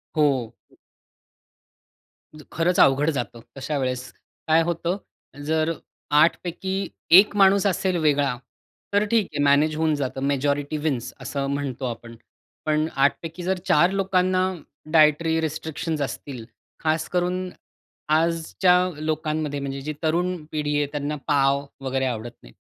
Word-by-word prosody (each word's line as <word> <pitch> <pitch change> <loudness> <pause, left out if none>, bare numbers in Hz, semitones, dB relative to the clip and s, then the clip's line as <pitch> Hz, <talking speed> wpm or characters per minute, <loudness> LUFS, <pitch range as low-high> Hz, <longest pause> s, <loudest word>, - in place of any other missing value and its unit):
हो. 150 -1 +4 2.1
ज 155 -1 -12
खरंच 170 +2 +1
अवघड 140 +3 +5
जातं 120 -1 -4 0.2
तशा 140 +3 -3
वेळेस. 125 -2 -3 0.4
काय 160 +1 +5
होतं, 170 +2 -1 0.5
जर 160 +1 +1 0.5
8 165 - +4
पैकी 190 +2 -3 0.3
1 205 +1 +2
माणूस 195 0 +5
असेल 185 0 0
वेगळा 145 -5 +1 0.6
तर 205 +1 +3
ठीक 220 -5 +3
आहे, 145 -1 0
मॅनेज 145 +2 +3
होऊन 160 0 +1
जातं. 135 -2 -3
मॅजॉरिटी 145 +1 0
विन्स 125 -4 -1
असं 140 +1 -3
म्हणतो 135 -2 -3
आपण, 115 -1 -6 0.5
पण 155 0 +1
8 140 +1 +4
पैकी 165 +2 -7
जर 190 +1 0
4 175 +5 +4
लोकांना 185 -1 +1 0.5
डायटरी 160 +1 +4
रिस्ट्रिक्शन्स 160 0 -3
असतील, 135 -3 -5 0.4
खास 160 0 0
करून 180 +1 -1 0.7
आजच्या 165 +3 +2 0.2
लोकांमध्ये 155 -1 -2
म्हणजे 140 0 -4
जी 155 +2 -4
तरुण 175 +3 +1 0.2
पिढी 150 -1 -1
आहे, 145 - +2
त्यांना 145 0 -3
पाव 140 -1 +2 0.2
वगैरे 130 0 0
आवडत 120 -1 -3
नाही. - - -15
155 Hz, 130 wpm, -24 LUFS, 140-170 Hz, 2.1 s, अवघड